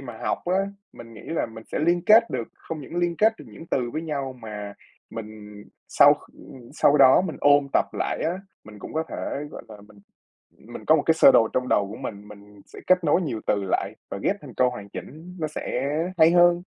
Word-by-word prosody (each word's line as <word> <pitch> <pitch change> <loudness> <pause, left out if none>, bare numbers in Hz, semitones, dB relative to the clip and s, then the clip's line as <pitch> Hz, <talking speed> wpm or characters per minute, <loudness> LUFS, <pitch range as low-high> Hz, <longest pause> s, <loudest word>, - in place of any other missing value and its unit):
mà 120 -5 -9
học - - -2
á 180 - 0 0.4
mình 115 -1 -13
nghĩ 105 - -11
là 165 - -2
mình 110 0 -12
sẽ - - -1
liên 170 +2 +1
kết 225 +2 +6
được, 115 - -4
không 160 -2 -8
những 145 +5 -9
liên 175 -1 0
kết 220 +4 +4
được - - -11
những 165 - -12
từ 125 -6 -1
với 155 +6 -4
nhau 140 -4 -4
mà 105 -4 -8 0.4
mình 105 -2 -10 0.2
sau, - - +6 0.2
ừm, 120 -3 -14
sau 145 -1 +3
đó 135 +2 +7
mình 180 -4 -4
ôn 145 0 +4
tập - - +3
lại - - -3
á, 165 - 0 0.3
mình 105 -1 -13
cũng - - -9
có 160 - 0
thể, - - -6 0.3
gọi - - -9
là, 110 - -11
mình 105 - -19 0.7
mình - - -9
có 160 - +6
một 145 - 0
cái 160 - +4
sơ 160 - +7
đồ 115 - +4
trong 125 0 -1
đầu 100 -4 +1
của 110 - -8
mình, 105 -5 -8
mình 105 0 -15
sẽ - - -14
kết 185 -1 +3
nối 160 +4 +3
nhiều 125 -9 -4
từ 100 -1 0
lại - - -1 0.2
và - - -5
ghép - - +1
thành - - -12
câu 125 0 +2
hoàn 100 -5 -9
chỉnh 160 - -10
nó 155 -2 -2
sẽ 130 -4 -4 0.4
hay 160 0 +7
hơn. 175 0 +4
130 Hz, 235 wpm, -24 LUFS, 110-165 Hz, 0.7 s, đó